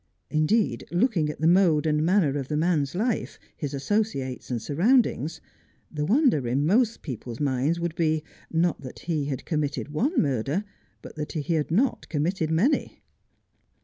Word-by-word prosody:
Indeed, 155 - +1
looking 175 -4 +1
at 150 - -6
the 160 - +3
mode 170 -4 +4
and 150 -1 +2
manner 170 -5 +3
of 135 - -5
the 150 - -1
man's 155 -3 +1
life, 220 +4 -1 0.2
his 145 -4 -4
associates 140 - -2
and 125 -2 -1
surroundings, 160 - +1 0.5
the 150 -1 -2
wonder 230 - +3
in 135 +5 +1
most 225 +6 +2
people's 120 -4 -6
minds 145 +3 0
would 170 -1 -2
be, 155 -2 0 0.3
not 165 -1 +1
that 130 -2 -9
he 155 -4 -1
had 135 -3 -4
committed 150 -3 -2
one 250 - 0
murder, 140 - 0 0.4
but - - -11
that 150 -1 -4
he 160 +2 -1
had 155 -2 0
not 235 +10 +1
committed 160 +2 -1
many. 190 - +1
155 Hz, 160 wpm, -26 LUFS, 145-185 Hz, 0.5 s, mode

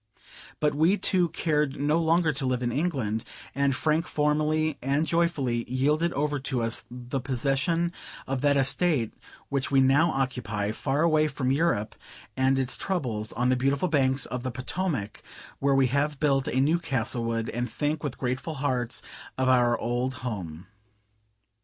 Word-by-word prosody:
But 150 -1 +2
we 160 +7 +3
two 180 -4 +2
cared 150 -4 0
no 150 +3 +2
longer 165 -1 +2
to 135 -1 -3
live 125 -1 0
in 120 - 0
England: 130 -7 -1 0.3
and 140 -1 +1
Frank 155 +5 +1
formally 155 +1 +1
and 140 +4 +1
joyfully 155 -9 0
yielded 150 +6 +1
over 145 0 -1
to 130 -2 -1
us 115 0 0
the 125 +2 -5
possession 140 +7 0 0.3
of 135 -1 -2
that 145 0 +3
estate 135 -2 +1 0.4
which 140 -1 -1
we 135 - +4
now 140 +5 +4
occupy, 125 -7 -2
far 140 +6 -1
away 155 -2 +3
from 130 -3 -1
Europe 135 -8 +1 0.4
and 130 0 +2
its 130 -1 +1
troubles, 120 - -2
on 125 +1 +1
the 130 - +4
beautiful 135 +7 +1
banks 135 -3 +2
of 125 0 -4
the 130 - -3
Potomac, 130 - -3 0.4
where 140 0 +2
we 135 -1 +4
have 140 +3 0
built 135 -3 +2
a 130 - 0
new 155 +6 +3
Castlewood, 115 -6 -1
and 120 0 -3
think 145 +6 -2
with 145 -4 -3
grateful 130 +5 -3
hearts 130 -4 -1 0.3
of 130 0 +1
our 120 -2 +4
old 120 +3 -2
home. 90 -8 -5
135 Hz, 160 wpm, -27 LUFS, 125-155 Hz, 0.4 s, we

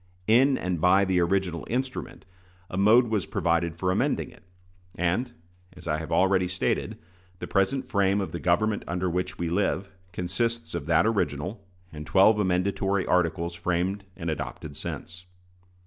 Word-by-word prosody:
In 130 +6 +4
and 90 -3 -2
by 95 +3 +5
the 95 -1 +1
original 90 -1 0
instrument, 130 +2 -4 0.5
a - - -4
mode 110 +5 +5
was 105 -4 -1
provided 85 -1 0
for 90 +1 0
amending - - 0
it; - - -18 0.6
and, 90 +9 0 0.4
as - - -13
I 75 -1 0
have 80 - -7
already 95 -1 +3
stated, 90 +1 -1 0.4
the - - -6
present 125 +7 0
frame 100 -3 +2
of 95 - -3
"the 85 - -4
government 105 +5 +1
under 90 +1 -1
which 90 -1 -2
we 85 - -2
live" 95 +2 -1 0.2
consists 115 +7 -2
of 85 -3 -4
that 85 0 +4
original, 100 -2 -1 0.3
and 75 0 -8
twelve 100 +5 +5
amendatory 95 +1 0
articles 85 -1 +1
framed 90 +3 -1
and 85 -3 -3
adopted 75 0 -6
since. 90 +5 -7
90 Hz, 155 wpm, -26 LUFS, 85-100 Hz, 0.6 s, by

